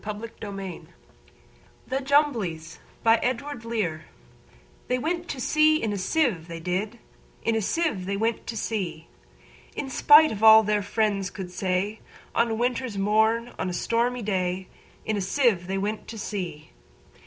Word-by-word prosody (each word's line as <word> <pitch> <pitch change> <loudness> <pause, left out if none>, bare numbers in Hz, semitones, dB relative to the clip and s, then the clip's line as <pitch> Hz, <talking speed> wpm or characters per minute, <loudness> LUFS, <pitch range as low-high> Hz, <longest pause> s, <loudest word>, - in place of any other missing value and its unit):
Edward 215 +2 -6
Lear 210 - -5
1812–88 190 -5 -7 1.0
The 265 +1 -2
Jumblies 230 - 0 0.3
Lear 225 0 +6
Edw 230 - -2 0.9
THEY 250 - +1
went 340 +6 -2
to 270 - -5
sea 310 +4 +4
in 220 -6 -1
a - - -2
sieve, 190 - 0
they 165 -1 -7
did; 185 +7 -2 0.5
In 230 - +1
a 220 - +1
sieve 220 - -1
they 200 0 -1
went 225 +2 -1
to 230 - -4
sea; 180 -8 -3 0.7
In 270 - -4
spite 300 +4 +7
of 210 - -5
all 220 0 +9
their 210 0 +1
friends 205 -2 0
could 185 -1 -7
say, 190 +3 -1 0.3
On 235 0 +2
a 225 - -1
winter's 245 -1 -1
morn, 220 +4 +2
on 185 - -1
a - - -4
stormy 235 +5 0
day, 185 -2 -2 0.4
In 215 -1 -1
a - - -1
sieve 195 -3 +1
they 195 +1 -2
went 210 +2 -3
to 225 - -8
sea. 185 -7 -5
215 Hz, 160 wpm, -26 LUFS, 190-240 Hz, 1.0 s, all